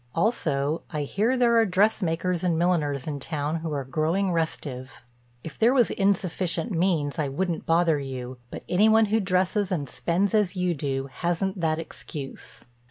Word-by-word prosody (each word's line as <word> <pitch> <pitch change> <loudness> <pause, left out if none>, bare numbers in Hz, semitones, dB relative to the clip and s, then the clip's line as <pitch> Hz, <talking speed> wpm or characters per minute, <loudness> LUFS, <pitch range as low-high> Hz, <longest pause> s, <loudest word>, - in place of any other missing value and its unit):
Also, 160 - 0
I 150 -3 -2
hear, 220 - 0
there 235 -2 +4
are 225 - +5
dressmakers 180 -3 +1
and 170 -3 +1
milliners 155 -6 +1
in 145 -2 -4
town 150 +2 -2
who 160 -1 -4
are 140 -2 -2
growing 160 +9 0
restive. 140 -6 -3 0.4
If 160 - -9
there 235 +4 +4
was 245 -3 +4
insufficient 195 0 0
means 165 -4 0
I 150 - +1
wouldn't 170 +5 -2
bother 165 -2 +3
you, 130 -2 -6
but - - -8
any 205 +5 +4
one 220 0 +5
who 225 - +4
dresses 190 +1 +1
and 150 -6 -1
spends 170 - 0
as 210 -3 +2
you 180 -1 0
do 135 -2 -3
hasn't 180 +2 -1
that 160 -1 +1
excuse. 150 -3 -8
170 Hz, 165 wpm, -26 LUFS, 145-190 Hz, 0.4 s, are